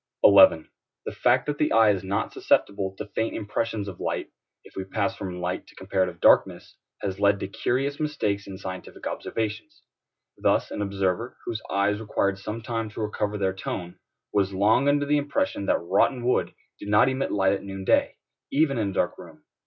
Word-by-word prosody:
11. 80 - +7 0.4
The - - -3
fact - - +2
that 145 0 -3
the 150 - +2
eye 110 -2 +6
is 95 -2 -2
not 95 +1 -2
susceptible 95 -1 +1
to 105 - -5
faint 110 +2 -2
impressions 110 0 -2
of 95 -3 -8
light, - - -3 0.3
if - - -17
we 95 - -3
pass 100 +3 -2
from 90 -4 -6
light 90 +1 -3
to - - -18
comparative 95 -2 -1
darkness, - - +3 0.3
has 95 -1 -3
led 100 0 +3
to - - -3
curious 135 +7 -1
mistakes 125 -10 -1
in 95 -1 -7
scientific 95 -1 -8
observations. 110 -1 -4 0.6
Thus - - +2
an - - -4
observer, 100 +3 -1
whose 115 -2 -3
eyes 100 +1 +1
required 100 -2 -1
some 105 +3 -6
time 115 -2 -3
to 110 - -10
recover 105 -1 -2
their 95 -2 0
tone, 90 -2 -6 0.3
was 100 -1 +1
long 110 +8 +3
under 145 0 +2
the 150 +1 +2
impression 140 -8 -1
that - - +3
rotten 120 +8 +1
wood 125 - +1 0.2
did 100 - -7
not 105 +4 +5
emit 130 +1 -1
light 95 -1 +2
at 100 - -3
noon 95 -1 -6
day, - - +2 0.4
even 140 -3 +2
in 105 -3 0
a - - -6
dark - - -1
room. - - -13
100 Hz, 190 wpm, -25 LUFS, 95-115 Hz, 0.6 s, 11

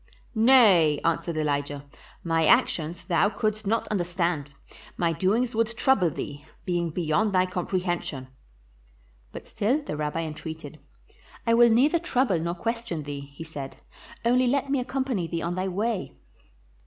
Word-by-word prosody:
"Nay," 220 - +5
answered 165 0 0
Elijah; 145 -1 -2 0.4
"my 165 -2 +1
actions 165 +3 +2
thou 180 +3 +2
couldst 215 -1 -2
not 225 +3 0
understand; 175 -6 -1 0.5
my 170 -1 +1
doings 210 +9 +1
would 230 +1 -1
trouble 205 -11 +3
thee, 145 -1 -7 0.2
being 175 -2 0
beyond 175 +6 0
thy 185 -1 +3
comprehension." 180 -6 -3 1.0
But - - -9
still 260 +9 0
the 150 - -5
Rabbi 150 +2 -2
entreated. 160 -1 -7 0.7
"I 230 - +3
will 235 0 +6
neither 275 +9 +4
trouble 255 - +1
nor 170 +2 -2
question 230 -4 -3
thee," 140 -1 -7
he 165 - -7
said; 145 -4 -8 0.5
"only 250 +2 +3
let 275 +2 0
me 280 - +2
accompany 255 -7 -2
thee 165 0 -3
on 170 - -2
thy 185 +1 -2
way." 205 +2 -2
180 Hz, 140 wpm, -26 LUFS, 160-230 Hz, 1.0 s, will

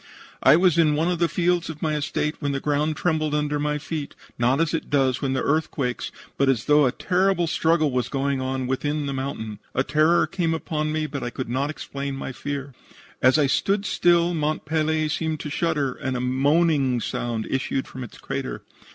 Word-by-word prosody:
I 135 - +7
was 175 -1 +4
in 155 -2 +4
one 160 +4 +1
of 175 - -2
the 170 -1 +2
fields 175 -1 +1
of 155 -1 -7
my 155 -1 +1
estate 150 +1 -1
when 145 -2 -1
the 135 - -1
ground 150 +2 0
trembled 155 -3 0
under 150 0 0
my 150 0 0
feet, 150 -1 -5 0.2
not 125 +4 +3
as 165 -1 +1
it 165 - -2
does 135 -3 +2
when 135 -2 0
the 130 - 0
earth 155 +2 +1
quakes, 125 -4 -3 0.3
but 140 0 +3
as 120 -4 +1
though 150 -2 +5
a - - +1
terrible 185 +4 +1
struggle 160 -2 +2
was 125 -2 -1
going 135 -1 -1
on 130 0 -2
within 145 +3 -1
the 140 - -2
mountain. 130 -6 -4 0.2
A 130 - +2
terror 155 +4 +3
came 170 -4 -1
upon 155 -1 -2
me, 155 0 -1
but 140 -2 -5
I 120 - -2
could 130 0 -5
not 135 +4 0
explain 140 -2 -5
my 135 - -5
fear. 140 +1 -5 0.5
"As 130 +3 +5
I 150 - +4
stood 195 +8 +1
still 175 -2 +3
Mont 155 -1 -1
Pelee 155 0 +1
seemed 160 0 -2
to 150 - -5
shudder, 150 -4 0
and 130 -1 -3
a - - -2
moaning 135 +1 +2
sound 115 -1 -3
issued 135 0 -1
from 130 - -7
its 120 - -10
crater. 135 -1 -5
150 Hz, 210 wpm, -24 LUFS, 135-160 Hz, 0.5 s, I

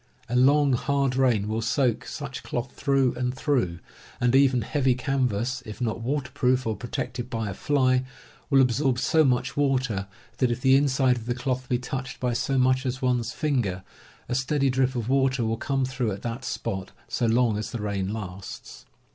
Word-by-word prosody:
A 120 - -2
long, 140 +2 +5
hard 140 0 +1
rain 120 -6 +2
will 110 +1 -1
soak 120 0 +1
such 135 -5 -6
cloth 120 +2 -4
through 135 -3 +1
and 125 0 -2
through, 125 - 0 0.4
and 120 +1 +2
even 135 -3 +4
heavy 130 +1 +1
can 135 0 0
vas, 120 +5 -2
if 110 -3 -9
not 115 -2 -2
waterproofed 130 -1 0
or 110 -1 -1
protected 120 +2 -4
by 115 -4 -2
a - - -5
fly, 130 +2 +2 0.5
will 135 -2 +5
ab 125 - +4
sorb 135 0 +1
so 160 +5 +3
much 125 -2 +1
water 130 -8 0 0.3
that 130 - +3
if 120 - -1
the 130 0 +5
inside 135 -2 +3
of 115 -1 -8
the 120 - 0
cloth 130 0 -3
be 125 - +2
touched 130 +1 -5
by 125 -1 0
so 135 +3 0
much 130 0 +3
as 130 0 -3
one's 125 -2 +1
finger 120 - -1 0.4
a 125 - -3
steady 135 +1 +1
drip 130 0 +1
of 115 -2 -2
water 135 -2 +2
will 110 0 0
come 135 +2 0
through 125 -4 -2
at 100 +1 -6
that 120 +2 -4
spot 95 -6 -4 0.2
so 120 - 0
long 115 -1 +3
as 105 +1 -3
the 120 - -5
rain 100 -2 -2
lasts. 95 -3 -8
125 Hz, 195 wpm, -26 LUFS, 115-135 Hz, 0.5 s, long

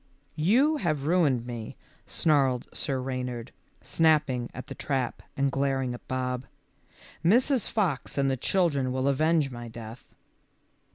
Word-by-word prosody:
"You 260 - +4
have 155 - -1
ruined 150 -8 +2
me," 120 -3 -6 0.3
snarled 135 -5 +2
Sir 135 -3 -1
Reynard, 125 -2 -4 0.3
snapping 150 -7 +2
at 130 - -8
the - - -7
trap 135 -4 -2 0.2
and 140 0 +2
glaring 135 -2 0
at 120 - -10
Bob. 125 0 -2 0.8
"Mrs. 245 - +3
Fox 180 - -1
and 140 -1 +2
the 135 - +2
children 140 -3 +1
will 130 +1 0
avenge 155 +1 +2
my 120 -1 -7
death." 115 +1 -10
135 Hz, 130 wpm, -28 LUFS, 125-160 Hz, 0.8 s, You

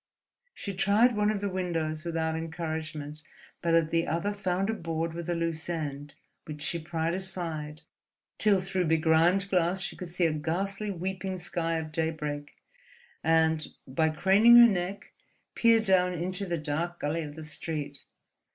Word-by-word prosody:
She 200 - -5
tried 210 +5 +3
one 210 0 +2
of 210 -2 -1
the 205 - -1
windows 165 -4 -2
without 160 -2 -1
encouragement, 160 -2 -4 0.4
but 170 -1 +2
at 165 -1 +2
the 165 0 +1
other 170 +6 -1
found 190 -1 -1
a - - -2
board 165 -4 -3
with 170 0 -6
a 175 - +1
loose 165 0 -2
end, 145 -3 -4 0.3
which 150 -1 -7
she 170 - -1
pried 165 0 -2
aside, 165 -5 -4 0.6
till 205 -3 +5
through 185 0 -1
begrimed 165 +4 +3
glass 180 0 +2
she 190 - -4
could 180 - -7
see 175 +1 0
a 160 - +2
ghastly, 195 +7 -2
weeping 190 0 -3
sky 175 -2 -2
of 155 -1 -5
daybreak 155 -2 -3 0.7
and, 160 -1 +3 0.2
by 160 +4 +1
craning 195 +9 +6
her 240 0 +10
neck, 190 -1 -3 0.4
peer 230 -1 +5
down 185 -4 +3
into 180 +3 -3
the 170 -1 -1
dark 165 +3 -3
gully 155 +3 -1
of 150 -2 -7
the 160 - -8
street. 150 -2 -5
170 Hz, 160 wpm, -28 LUFS, 160-190 Hz, 0.7 s, her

